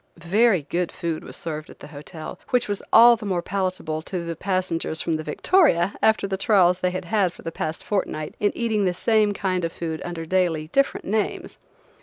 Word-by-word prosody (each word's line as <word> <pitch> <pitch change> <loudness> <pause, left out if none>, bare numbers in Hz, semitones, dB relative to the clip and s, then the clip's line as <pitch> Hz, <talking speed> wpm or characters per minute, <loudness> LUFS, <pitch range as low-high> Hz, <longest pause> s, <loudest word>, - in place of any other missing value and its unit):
Very 190 +1 +2
good 175 +4 -2
food 165 -2 -4
was - - -8
served 155 -2 -5
at - - -13
the - - -11
hotel–which 155 - -4
was 205 -1 -3
all 235 +1 +8
the 220 -2 -9
more 180 -3 -1
palatable 185 -5 -2
to 170 +1 -5
the 170 0 -4
passengers 185 -3 -2
from 165 - -1
the 155 - -1
Victoria 175 - +2
after 220 -2 +3
the 195 -1 -2
trials 185 -3 +3
they 180 - +1
had 180 0 -5
had 195 -1 +1
for - - -15
the 165 - -4
past 160 0 -4
fortnight 155 -7 -2
in 205 - +2
eating 220 -4 0
the 180 -1 0
same 215 +1 +2
kind 185 -3 -1
of 165 - -1
food 160 -2 -5
under 170 -2 -5
daily 165 -3 0
different 275 +8 +1
names. 215 +2 -2
180 Hz, 200 wpm, -23 LUFS, 165-205 Hz, -, all